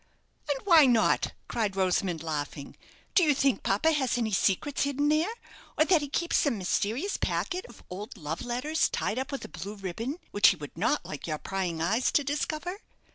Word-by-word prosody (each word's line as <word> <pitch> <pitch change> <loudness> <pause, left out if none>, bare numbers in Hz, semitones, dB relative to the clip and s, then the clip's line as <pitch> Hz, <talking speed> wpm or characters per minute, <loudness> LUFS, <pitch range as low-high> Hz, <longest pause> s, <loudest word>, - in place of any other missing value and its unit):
"And 285 - +1
why 330 -7 +7
not?" 235 -3 +3
cried 215 -5 -1
Rosamond, 180 -3 0
laughing. 145 -2 -4 0.4
"Do - - +5
you 295 -3 +4
think 270 -1 +2
papa 210 +12 +2
has 265 -6 +1
any 225 -2 -1
secrets 200 +8 +1
hidden 285 +1 +1
there; 310 +5 +2 0.5
or 310 - +5
that 340 -3 +4
he 290 - -4
keeps 340 +4 0
some 275 -7 +2
mysterious 220 - -1
packet 365 0 -2
of 240 - -15
old 205 +6 -7
love 160 -1 -4
letters 250 +6 0
tied 230 - -1
up 270 +3 -4
with 275 - -4
a - - -7
blue 195 +7 -7
ribbon, 215 - -4
which 205 - +5
he - - +5
would 145 -4 -9
not 220 - 0
like 150 - -7
your 155 -2 -2
prying 175 -2 -3
eyes 225 +9 +1
to 290 - +3
discover? 305 +6 -3
240 Hz, 190 wpm, -28 LUFS, 190-295 Hz, 0.5 s, why